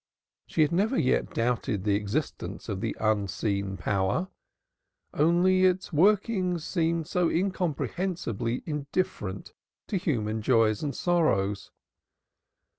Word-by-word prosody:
She 155 - +2
had 150 - +1
never 210 +9 +1
yet 130 - +1
doubted 115 -4 -1
the 105 -1 +2
existence 100 0 -3
of - - -3
the - - -3
Unseen 100 -2 -1
Power; 100 - 0 0.8
only 175 +4 +3
its 185 -1 +1
workings 185 0 +2
seemed 165 -2 0
so 180 0 +1
incomprehensibly 170 - -2
indifferent 145 - -3 0.4
to 200 - 0
human 110 -10 -1
joys 110 -2 +3
and 145 -2 -3
sorrows. 105 - +1
150 Hz, 110 wpm, -27 LUFS, 105-180 Hz, 0.8 s, only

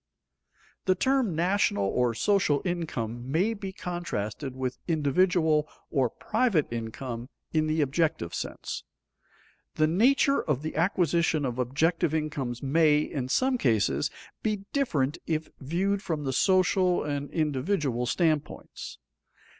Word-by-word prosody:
_ - - -55
The 185 - +3
term 260 -4 +1
national 175 - +2
or 120 +4 +1
social 165 - +2
income 130 -9 -3
may 190 +9 +2
be 200 -3 -6
contrasted 145 - -4
with 130 -1 -3
individual 160 0 +2 0.2
or 135 -5 +2
private 215 - +1
income 115 +2 -5 0.2
in 155 -1 +2
the 155 0 +1
objective 150 - 0
sense. - - -5 0.9
The 155 - +3
nature 255 - +3
of 150 -2 -1
the 155 - -4
acquisition 170 -3 +2
of 125 -1 -3
objective 160 +6 +1
incomes 140 -6 -3
may, 150 +2 +4
in 130 -4 -3
some 255 - +2
cases, 105 - +2 0.3
be 210 -2 -1
different 155 - 0
if 160 -1 -1
viewed 190 +8 0
from 160 -6 -3
the 135 -1 -1
social 185 +3 +3
and 145 -1 -3
individual 145 -4 0
standpoints. 155 -1 -1
155 Hz, 125 wpm, -28 LUFS, 130-180 Hz, 0.9 s, may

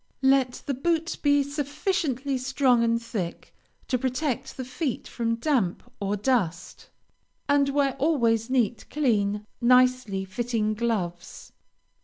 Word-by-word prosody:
Let 265 -2 +3
the 280 - -1
boots 330 +4 0
be 285 -1 +3
sufficiently 285 -1 -2
strong 255 -2 +2
and 230 0 +2
thick 215 -7 -5 0.3
to 255 - 0
protect 265 +1 -2
the 260 - -4
feet 255 +1 -3
from 230 -1 -1
damp 235 - 0 0.2
or 200 0 -1
dust, 195 -7 -1 0.6
and 285 -1 +3
wear 275 -1 +1
always 235 -7 +2
neat, 240 -3 0
clean, 210 -8 0 0.2
nicely 250 -5 +3
fitting 215 +2 -1
gloves. 210 -7 -3
250 Hz, 120 wpm, -26 LUFS, 225-275 Hz, 0.6 s, Let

